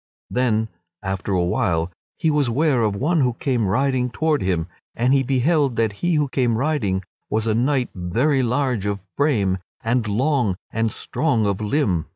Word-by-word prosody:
Then, 110 -3 +1 0.4
after 95 0 -3
a 90 -2 +2
while, 85 -1 0 0.3
he 160 -2 +1
was 145 -4 +2
ware 135 0 +2
of 105 -3 +1
one 155 - +1
who 125 -2 +2
came 120 -3 0
riding 130 +4 +1
toward 155 +3 0
him, 90 -4 0 0.3
and 125 +3 +2
he 135 - +4
beheld 135 +1 +2
that 115 -2 +1
he 175 -1 +2
who 150 -1 +2
came 125 -4 +1
riding 115 -9 0 0.3
was 110 +1 0
a 110 - +1
knight 125 +2 +1
very 120 - +1
huge 125 -4 0
of 100 -1 -1 0.2
frame, 105 -11 +1 0.2
and 115 0 +1
long 120 -1 +1 0.2
and 115 -1 0
strong 130 -5 0
of 100 0 -1
limb. 105 - 0
120 Hz, 175 wpm, -22 LUFS, 105-140 Hz, 0.4 s, he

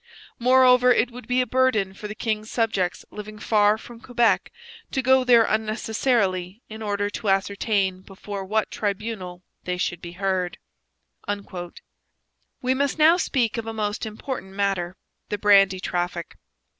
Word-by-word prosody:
Moreover 250 0 +5
it 245 0 +2
would 240 -2 -11
be 250 +1 +2
a - - 0
burden 245 -6 +1
for 210 - -7
the 210 - -7
king's 215 -2 -2
subjects 205 -6 -1
living 215 0 -8
far 210 -1 +3
from 230 +1 -12
Quebec 240 -2 +1 0.4
to 265 - -1
go 260 +1 +5
there 240 -2 +6
unnecessarily 215 -3 0
in 220 0 -9
order 205 -1 -1
to 205 - -3
ascertain 195 -1 0
before 195 +1 -7
what 215 +3 -1
tribunal 200 -3 -4 0.2
they 180 0 -2
should 175 -1 -2
be 170 0 -8
heard. 185 -1 -1 2.1
We 255 +1 +2
must 280 +2 0
now 320 +3 +6
speak 245 - 0
of 225 - -6
a 225 - -4
most 215 0 -2
important 215 -2 -6
matter 190 -2 -1 0.3
the 210 - -1
brandy 195 -2 +5
traffic. 175 -2 -3
215 Hz, 145 wpm, -24 LUFS, 195-240 Hz, 2.1 s, there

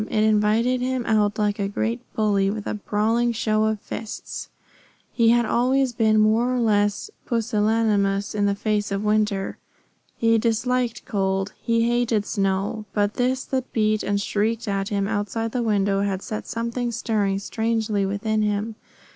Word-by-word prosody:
It 215 - +1
invited 220 +4 +2
him 255 -1 -1
out 210 -2 +2
like 210 -1 0
a 200 - 0
great 225 +4 -2
bully, 200 -3 +2
with 210 0 -4
a - - -2
brawling 220 +3 0
show 215 -1 +1
of 220 -1 0
fists. 220 - -6 0.6
He 230 -2 +4
had 240 0 +4
always 255 +3 +2
been 220 -2 +3
more 220 +3 +3
or - - 0
less 205 - +1 0.2
pusillanimous 215 -3 +1
in 205 -1 +1
the 200 - +1
face 210 0 -1
of 200 +1 -1
winter. 210 -2 0 0.6
He 230 0 +3
disliked 235 +1 0
cold. 195 -1 -1
He 230 0 +1
hated 235 -3 +1
snow. 195 +2 -1
But 205 0 +1
this 255 +1 0
that 260 -1 -3
beat 215 -1 +2
and 200 +1 0
shrieked 220 +3 -1
at 195 0 -1
him 200 -2 0
outside 220 +2 -2
the 250 - -1
window 200 -3 +1
had 195 -1 -2
set 215 - -5
something 235 +1 -2
stirring 215 -4 0
strangely 220 0 -1
within 215 +2 -1
him. 210 +1 -1
215 Hz, 160 wpm, -23 LUFS, 205-230 Hz, 0.6 s, He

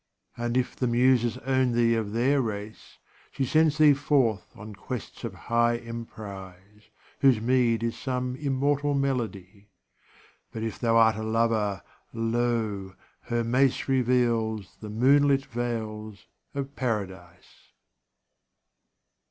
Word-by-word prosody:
And 120 +1 -1
if 130 - -1
the 125 - -1
Muses 120 -1 +3
own 130 -2 +2
thee 115 0 +3
of 110 -3 -2
their 130 +5 +2
race, 110 -2 -6 0.3
She 135 - -1
sends 155 +2 +3
thee 155 -2 +7
forth 135 - +1
on 105 +1 -9
quests 110 +4 -7
of - - -5
high 120 0 +2
emprise, 105 -4 -10 0.3
Whose 130 -5 +4
meed 115 -1 +2
is 115 0 -2
some 125 -1 -2
immortal 145 +1 0
melody; 105 -7 -3 0.8
But 110 - -5
if 115 - -4
thou 115 -1 +2
art 110 -1 +5
a 110 - -4
lover, 110 -3 0 0.3
lo! 115 -4 -1 0.3
her 120 0 -1
mace 130 +3 +1
Reveals 120 -5 0
the 105 - -8
moonlit 135 +5 +3
vales 110 -3 -5 0.3
of 140 0 -4
paradise. 95 -7 -5
115 Hz, 120 wpm, -27 LUFS, 110-130 Hz, 0.8 s, thee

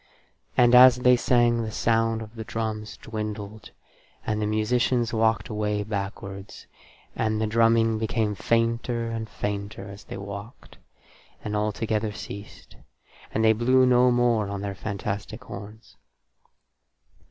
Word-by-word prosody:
And, 120 0 +5
as 125 0 +9
they 125 0 +4
sang, 120 -1 +2
the 110 - -3
sound 115 0 +1
of 110 0 -12
the 110 -1 -6
drums 110 -1 -4
dwindled, 105 -1 -6 0.6
and 105 0 -1
the 105 - 0
musicians 120 +2 +1
walked 110 -1 +1
away 105 -1 -1
backwards, 100 -1 -6 0.5
and 110 -1 0
the 110 - +1
drumming 115 0 +3
became 110 -1 0
fainter 115 +2 0
and 110 -1 -4
fainter 100 -1 -4
as 100 +1 -11
they - - -7
walked, 100 +4 -9 0.6
and 105 0 -3
altogether 105 +1 -1
ceased, 100 0 -10 0.5
and 110 - +1
they 110 - +6
blew 130 +4 +3
no 125 0 +5
more 120 -4 +2
on 100 -1 -4
their 100 -1 -3
fantastic 100 0 -5
horns. 105 +2 -11
110 Hz, 130 wpm, -25 LUFS, 105-115 Hz, 0.6 s, as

